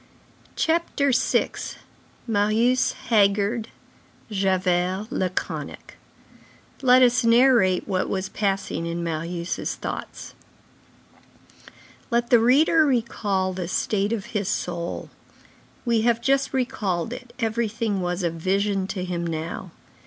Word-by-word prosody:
CHAPTER 320 -4 +1
VI—MARIUS 230 -1 0 0.2
HAGGARD, 205 +1 +3 0.6
JAVERT 185 -1 +1
LACONIC 185 -9 -4 0.9
Let 255 -1 +6
us 245 -1 +4
narrate 230 -6 +4
what 185 -2 -1
was 190 0 -2
passing 195 -4 -2
in 170 0 -3
Marius' 170 +1 -3
thoughts. - - -6 1.8
Let 235 -1 0
the 240 - +7
reader 295 +7 +5
recall 210 -8 0
the 180 -2 -4
state 200 +3 0
of 215 -4 -2
his 205 -2 -1
soul. 175 -4 -3 0.7
We 235 -2 +2
have 235 0 +2
just 270 +2 +1
recalled 225 -7 -1
it, 250 -1 -10
everything 225 -3 -1
was 180 +1 -2
a 170 - +1
vision 195 +3 0
to 185 -2 -4
him 170 -1 -3
now. 165 +2 -4
205 Hz, 105 wpm, -24 LUFS, 185-235 Hz, 1.8 s, the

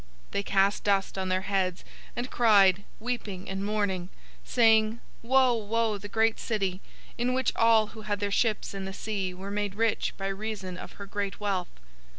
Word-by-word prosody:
018:019 - - -29
They - - 0
cast 200 0 +2
dust 195 -1 +1
on 190 0 -2
their 185 0 +1
heads, 190 -2 -1 0.3
and 245 +2 -4
cried, 200 -5 +5
weeping 215 -5 -4
and 195 +1 -3
mourning, 200 -4 -1 0.3
saying, 225 -1 +4 0.2
'Woe, 255 +1 +4
woe, 225 -1 0
the 205 - -7
great 225 +2 +2
city, 195 -4 -1 0.4
in 250 +1 +1
which 260 -1 0
all 230 -1 +5
who 220 - -9
had 210 -1 -2
their 200 0 -1
ships 215 -1 +1
in 195 -1 -5
the 195 - -5
sea 195 -2 -3
were 190 +2 -7
made 205 -1 -2
rich 225 0 0
by 195 - -4
reason 195 -2 -4
of - - -9
her 200 - -8
great 200 0 -3
wealth!' 195 -4 -1
205 Hz, 180 wpm, -28 LUFS, 195-225 Hz, 0.4 s, cried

